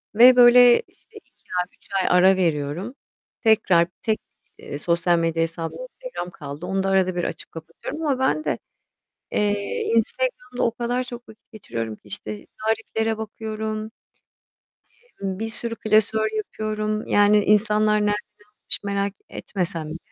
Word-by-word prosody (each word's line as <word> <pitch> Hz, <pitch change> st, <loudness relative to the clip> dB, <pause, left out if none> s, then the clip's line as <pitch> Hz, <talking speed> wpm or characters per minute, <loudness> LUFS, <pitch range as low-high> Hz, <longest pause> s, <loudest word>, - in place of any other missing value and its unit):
ve 250 Hz, +2 st, +8 dB
böyle, 245 Hz, -, +7 dB
işte, 445 Hz, -1 st, -20 dB
2 -, -, -20 dB, 0.2 s
ay, 180 Hz, -, +1 dB
3 -, -, -25 dB
ay 180 Hz, -, +3 dB
ara 190 Hz, +1 st, +6 dB
veriyorum. 170 Hz, -, -1 dB, 0.5 s
Tekrar 190 Hz, -6 st, +4 dB
tek, 220 Hz, -1 st, 0 dB, 0.4 s
eee, 145 Hz, -, -7 dB
sosyal 170 Hz, +1 st, +2 dB
medya 165 Hz, 0 st, +1 dB
hesabım 165 Hz, 0 st, -5 dB
Instagram -, -, -7 dB
kaldı. 145 Hz, +2 st, -8 dB
Onu 190 Hz, +1 st, -1 dB
da 195 Hz, -, 0 dB
arada 185 Hz, -2 st, +2 dB
bir 175 Hz, -, -1 dB
açıp -, -, -5 dB
kapatıyorum 165 Hz, -, -8 dB
ama 270 Hz, -3 st, +1 dB
ben 265 Hz, +4 st, +1 dB
de, -, -, -1 dB, 0.7 s
eee, 205 Hz, -1 st, -1 dB
Instagram'da 250 Hz, +2 st, -1 dB
o 230 Hz, -, +2 dB
kadar 245 Hz, +2 st, -2 dB
çok 245 Hz, -2 st, -10 dB
vakit 220 Hz, +2 st, -18 dB
geçiriyorum 115 Hz, -, -5 dB
ki, -, -, -29 dB
işte, 105 Hz, +1 st, +2 dB, 0.2 s
tariflere 220 Hz, 0 st, -1 dB
bakıyorum, 220 Hz, 0 st, -4 dB, 1.1 s
i 480 Hz, -, -15 dB
ımm, 190 Hz, 0 st, -2 dB
bir 225 Hz, 0 st, -3 dB
sürü 230 Hz, 0 st, -4 dB
klasör 220 Hz, 0 st, +2 dB
yapıyorum 215 Hz, 0 st, -3 dB
yani 205 Hz, 0 st, +4 dB
insanlar 210 Hz, 0 st, +3 dB
nereden 205 Hz, 0 st, +2 dB, 0.5 s
almış -, -, +1 dB
merak 200 Hz, 0 st, -1 dB, 0.2 s
etmesem 170 Hz, -5 st, -4 dB
bile. 160 Hz, -, -5 dB
210 Hz, 150 wpm, -23 LUFS, 180-230 Hz, 1.1 s, ve